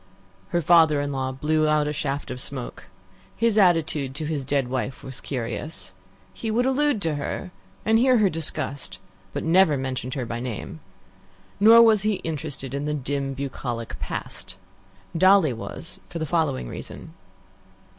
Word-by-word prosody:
Her 175 - +1
father 160 -2 +5
in 145 0 -2
law 130 -1 -2
blew 155 +3 +1
out 150 -1 +2
a 150 - -1
shaft 140 -1 -3
of 125 - -4
smoke. 130 -2 -6 0.5
His 230 -2 +2
attitude 160 -8 +2
to 155 +1 -3
his 150 -3 -2
dead 140 -1 0
wife 130 +1 -3
was 130 -1 -8
curious. 120 -1 -5 0.4
He 225 - -5
would 235 +3 +1
allude 265 -4 +1
to 155 -3 0
her, 145 +5 -4 0.3
and 225 +1 +4
hear 255 0 +5
her 210 -3 +4
discussed, 155 -4 0 0.3
but - - -4
never 165 -2 +4
mentioned 130 -1 -4
her 130 -3 -2
by 120 0 -4
name. 120 -9 -6 0.8
Nor 225 +3 +8
was 220 -3 +5
he 215 0 +1
interested 145 -4 -4
in 140 +1 -2
the 150 0 -1
dim, 140 0 -2
bucolic 125 -4 -5
past. - - -6 0.6
Dolly 185 -4 +5
was 115 +7 -8
for 170 - -6
the 160 - -2
following 155 - 0
reason. - - -9
150 Hz, 160 wpm, -24 LUFS, 135-175 Hz, 0.8 s, Nor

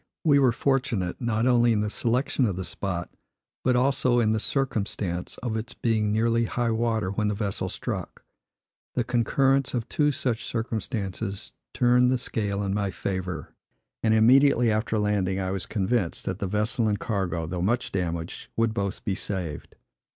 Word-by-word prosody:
We 145 -3 +5
were 130 -3 +5
fortunate, 125 -8 0
not 115 -1 +1
only 120 -2 +4
in 105 - +1
the 105 - -1
selection 125 +3 +1
of 100 - -1
the 95 - -3
spot, 90 +1 -4 0.5
but 125 0 +3
also 125 -1 +3
in 110 -2 +3
the 110 - +1
circumstance 105 -9 -2
of 120 -3 -1
its 115 +2 -4
being 110 -3 +1
nearly 115 +2 +2
high 120 +1 0
water 110 -4 0
when 105 +1 0
the 105 - 0
vessel 100 -2 -2
struck. - - -5 0.7
The 125 - +2
concurrence 130 +3 +2
of 120 -1 -2
two 150 +3 +2
such 125 -5 -1
circumstances 110 -3 -4 0.2
turned 125 -1 +4
the 130 - +2
scale 105 -4 -2
in 95 -1 -1
my 100 -1 0
favor; 95 -4 -4 0.5
and 110 -1 +3
immediately 125 +1 +5
after 110 +1 0
landing 100 -3 +1
I 95 -1 -1
was 95 -2 -3
convinced, 100 -3 -1
that 95 +1 -3
the 100 - -1
vessel 105 +3 +1
and 105 -1 +1
cargo, 95 -7 -2
though 85 +2 -3
much 115 +7 0
damaged, 85 -3 -3
would 115 -1 +2
both 100 -2 -3
be 100 - 0
saved. 90 -5 -4
110 Hz, 170 wpm, -26 LUFS, 95-120 Hz, 0.7 s, We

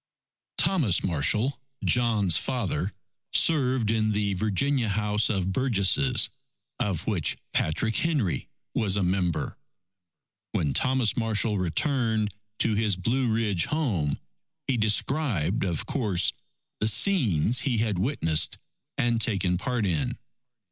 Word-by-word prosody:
_ - - -60
Thomas 135 - +2
Marshall, 105 - +1 0.3
John's 110 -8 +2
father, 105 -6 -1 0.4
served 130 -8 +3
in 110 -1 +1
the 105 -1 0
Virginia 110 +6 0
House 105 +1 +1
of 95 -2 -1
Burgesses 125 +2 +2 0.5
of 95 -2 -1
which 95 -8 0 0.2
Patrick 110 +8 +1
Henry 135 - 0 0.3
was 100 -3 +1
a 100 - 0
member. 90 -2 -1 0.9
When 70 -3 0
Thomas 130 -4 +1
Marshall 110 -2 0
returned 110 - 0 0.2
to 115 - +1
his 105 -2 +1
Blue 115 +7 0
Ridge 105 -6 +1
home, 110 - -1 0.5
he 135 - 0
described, 110 - +1
of 85 -5 -1
course, 105 -10 +1 0.5
the 105 - 0
scenes 120 - +3
he 130 -5 0
had 105 -4 0
witnessed 85 - 0 0.4
and 120 -1 +1
taken 95 -4 +1
part 120 +4 -1
in. 80 -6 -1
110 Hz, 120 wpm, -26 LUFS, 95-125 Hz, 0.9 s, served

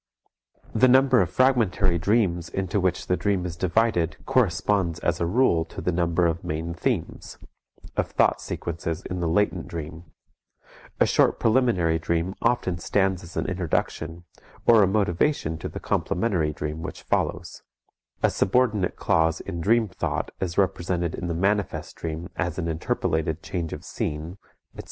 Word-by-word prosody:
The 120 +3 +5
number 130 -1 +5
of 90 - 0
fragmentary 100 -6 +2
dreams 85 -3 +1
into 95 +1 -1
which 95 -1 0
the 90 - +1
dream 95 -2 0
is 85 -2 -4
divided 90 -3 +1
corresponds 100 - +1
as 85 0 0
a 85 - +1
rule 90 -5 +3
to - - -10
the 90 - 0
number 85 0 +1
of 85 0 0
main 80 +2 -3
themes, 85 - -3 0.6
of - - 0
thought - - +2
sequences 85 -1 -4
in 90 - -4
the 85 - 0
latent 90 0 +1
dream; 80 +1 -7 0.9
a - - +6
short - - +3
preliminary 110 -9 +2
dream 85 +3 -1
often 95 -8 +1
stands 95 0 +1
as 85 0 -10
an - - 0
introduction 85 -1 -2 0.4
or 115 -2 +7
a 100 - +5
motivation 95 - 0
to - - -5
the - - -7
complementary 90 -6 0
dream 75 +1 -5
which 80 - -7
follows; 85 -1 -2 0.6
a - - +4
subordinate 105 -4 +1
clause 80 0 +1
in 85 - -5
dream 110 +5 +3
thought 95 - -3
is 90 -2 -3
represented 90 -3 0
in 85 - -4
the 85 - -2
manifest 100 +3 -1
dream 80 +1 -5
as 85 -2 -2
an 85 -2 -2
interpolated 80 -3 -1
change 85 -3 -3
of - - -7
scene, 80 +6 -4 0.3
etc. - - -15
90 Hz, 155 wpm, -25 LUFS, 80-100 Hz, 0.9 s, or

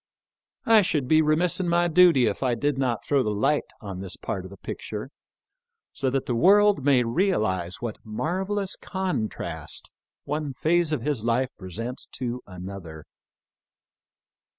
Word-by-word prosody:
I 225 -1 +7
should 150 -8 0
be 155 +3 +5
remiss 160 +4 +2
in 180 -2 0
my 175 0 +3
duty 170 -6 +6
if - - -1
I 125 -3 +1
did 145 +4 0
not 130 -4 -1
throw 140 -2 +2
the 110 - -1
light 105 +8 +1
on 100 -4 -6
this 95 -1 -6
part 95 -3 -4
of - - -8
the 100 - -12
picture, 105 +7 -6 0.8
so 135 - -2
X - - +2
PREFACE. - - -9
that 135 -1 0
the 125 -4 -1
world 200 - +5
may 135 -3 +4
realize 110 - 0
what 115 -3 -4
marvellous 185 - -2
con 185 - -2
trast - - -5 0.3
one 150 -1 -3
phase 165 +4 +1
of 155 - -1
his 145 -7 -1
life 120 +3 +1
presents 115 +7 -6
to 125 -1 -4
another. 90 -4 -8
130 Hz, 165 wpm, -25 LUFS, 110-170 Hz, 0.8 s, I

